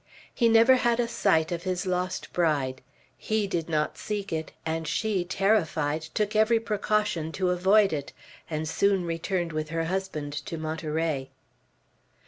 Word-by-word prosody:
He 235 -3 +3
never 230 +3 +6
had 240 -1 +1
a 240 - +2
sight 165 -8 +2
of 170 -1 -2
his 185 0 -2
lost 180 0 -2
bride. 145 -7 0 0.4
He 215 -1 0
did 170 -4 -3
not 150 -1 -1
seek 205 -3 -4
it; 160 0 -3
and 160 0 -2
she, 205 +2 0
terrified, 175 -6 +1
took 210 +7 -2
every 220 +2 +4
precaution 210 -6 -1
to 185 -1 0
avoid 195 +2 +4
it, 145 -2 -4 0.4
and 155 0 -2
soon 195 +2 +2
returned 170 +1 -2
with 155 0 -3
her 165 0 -1
husband 165 -5 -3
to 165 +2 -5
Monterey. 155 -3 -2
175 Hz, 150 wpm, -27 LUFS, 160-205 Hz, 0.4 s, never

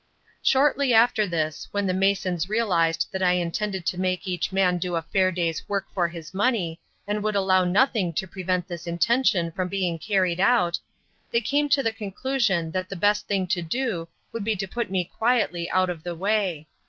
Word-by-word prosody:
Shortly 270 -2 +3
after 225 -2 +4
this, 155 -3 -2
when 205 0 -1
the 185 - +1
masons 190 -2 0
realised 180 -7 +1
that 190 - -3
I 180 -1 +4
intended 180 +2 -2
to 180 - -1
make 185 +1 -1
each 180 -2 -2
man 185 -2 +2
do 175 0 -2
a 165 - -1
fair 185 +2 +2
day's 170 -3 -2
work 200 -1 -1
for 180 -4 +1
his 170 -1 -9
money, 190 -6 0 0.3
and 210 +1 -2
would 215 0 -1
allow 190 -1 +3
nothing 200 -1 +2
to 190 - -2
prevent 180 -1 -2
this 175 -2 -7
intention 175 -1 +2
from 185 +2 -2
being 180 -3 -1
carried 185 -2 +1
out, 185 -5 +3 0.5
they 235 - +2
came 290 +5 0
to 275 -1 +3
the 225 - +1
conclusion 210 -5 -1
that 185 +1 -3
the 195 - -5
best 205 +3 +1
thing 195 -2 0
to 180 -2 +1
do 175 -1 -2 0.2
would 230 - -4
be 220 +1 0
to 195 0 -4
put 235 +2 -3
me 185 -1 0
quietly 180 -5 0
out 185 -1 +2
of 165 -3 -7
the 175 +1 -5
way. 190 -4 0
185 Hz, 195 wpm, -25 LUFS, 175-210 Hz, 0.5 s, after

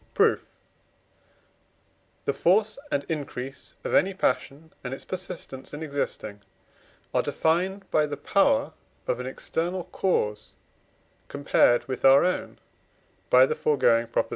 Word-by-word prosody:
Proof. - - +3 1.8
The 140 - +1
force 210 - +2
and 140 - 0
increase 135 -4 -6
of - - -3
any 190 +1 +3
passion 160 0 -2
and 125 +1 -4
its - - -11
persistence 170 -7 -7
in 155 - -6
existing 135 -8 -4 0.7
are - - +3
defined 185 +5 0
by 150 -1 +3
the 145 -1 -5
power 275 - +2 0.3
of - - -1
an - - -4
external 185 - -3
cause 105 - -1 0.7
compared 140 -3 +2
with 130 -1 -5
our 135 +3 +7
own 180 - -2 0.7
(by 130 +1 +7
the - - -1
foregoing 120 -6 +2
Prop.) 115 - -1
150 Hz, 125 wpm, -26 LUFS, 135-185 Hz, 1.8 s, our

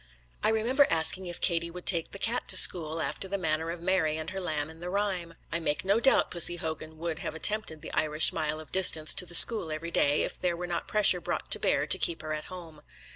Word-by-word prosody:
I - - +3
remember 240 +6 +1
asking 165 +3 +3
if 175 - -9
Katie 170 -2 -1
would 180 +1 -12
take 170 -3 +1
the - - -8
cat 235 +5 -2
to 185 - +6
school, 165 -3 +6
after 195 - -5
the 200 +1 -4
manner 160 -2 -3
of 170 0 -7
Mary 170 -4 -1
and 160 +1 -7
her 195 - -6
lamb 150 -4 -3
in 160 +1 -15
the 175 +1 -8
rhyme. 185 -4 -3 0.2
I 165 - -2
make 160 +1 -3
no 200 +3 +1
doubt 270 +3 +2
Pussy 175 0 +2
Hogan 160 -2 -8
would 165 0 -6
have 170 -4 -7
attempted 160 -3 -1
the - - -10
Irish 155 0 +2
mile 155 -1 -4
of 155 - -14
distance 160 -5 +3
to 180 - +2
the 175 - -1
school 210 -4 +7
every 160 +2 -7
day, 145 -2 0
if - - -7
there 175 -2 -3
were 180 - -6
not 175 -1 -5
pressure 200 -4 +2
brought - - -6
to - - +3
bear - - -1
to - - +1
keep 165 - -3
her 155 0 -5
at 155 0 -7
home. 165 -4 -12
170 Hz, 245 wpm, -27 LUFS, 160-185 Hz, 0.2 s, school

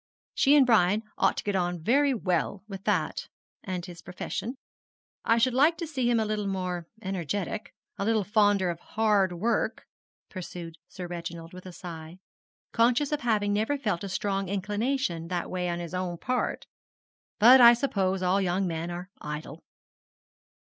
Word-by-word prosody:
She 280 +2 +4
and 280 -3 +6
Brian 215 -2 +3 0.2
ought - - +3
to - - -3
get 205 -1 -1
on 175 -1 0
very 275 - +3
well 190 -4 -1
with 195 -2 -8
that, - - 0 0.4
and 180 -2 -4
his 175 -2 -10
profession. 210 +7 -5 0.7
I 230 - +3
should 245 +2 +3
like 300 +6 +4
to 335 - -3
see 265 -6 -1
him 235 -1 +3
a 220 - +1
little 210 -1 -2
more 180 -3 -3 0.2
energetic 190 +2 -3 0.2
a 200 - -1
little 220 -1 +2
fonder 205 -3 +3
of 170 - -7
hard 210 -3 +1
work,' 220 +7 -1 0.4
pursued 170 -3 -8
Sir 180 - -7
Reginald, 170 -1 -7
with 185 0 -10
a - - -8
sigh, 170 -1 -9 0.5
conscious 245 +5 +2
of 300 - -1
having 210 -4 +1
never 220 +8 0
felt 210 -10 -2
a 200 - -4
strong 195 0 -2
inclination 205 -2 -1
that 175 0 -3
way 180 -1 -1
on 170 - -2
his 175 0 -6
own 180 -1 -2
part; 250 +8 -2 0.7
'but 245 +4 +8
I 240 0 +9
suppose 195 -7 0
all 185 +2 +2
young 190 +1 0
men 165 -1 -3
are 175 +3 -7
idle.' 150 +1 -6
195 Hz, 170 wpm, -28 LUFS, 175-225 Hz, 0.7 s, I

